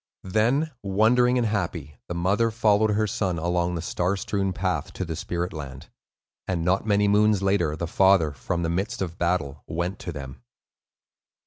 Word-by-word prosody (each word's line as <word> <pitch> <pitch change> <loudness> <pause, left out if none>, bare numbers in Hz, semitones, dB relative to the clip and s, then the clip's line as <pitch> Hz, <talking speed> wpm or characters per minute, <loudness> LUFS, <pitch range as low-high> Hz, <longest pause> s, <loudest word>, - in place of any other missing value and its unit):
Then, 120 +11 +1
wondering 115 +5 +3
and 120 - +1
happy, 85 - -3
the 90 - -4
mother 100 +7 +2
followed 110 -1 +3
her 105 +1 +1
son 95 -4 -1
along 85 +1 0
the 85 - -4
star 90 +3 -1
strewn 95 0 -1
path 90 -5 -2
to 95 - -4
the 80 -1 -4
spirit 90 0 -3
land; 70 -2 -8 0.6
and 85 -3 -1
not 95 +4 +1
many 105 0 +3
moons 105 -1 +3
later, 95 -6 +1
the 85 - -3
father, 95 -2 +4
from 85 +5 -3
the 80 - 0
midst 95 +6 -2
of 85 -1 -7
battle, 80 -5 -1
went 85 +3 -3
to 90 - -5
them. 65 -5 -8
95 Hz, 175 wpm, -25 LUFS, 85-105 Hz, 0.6 s, father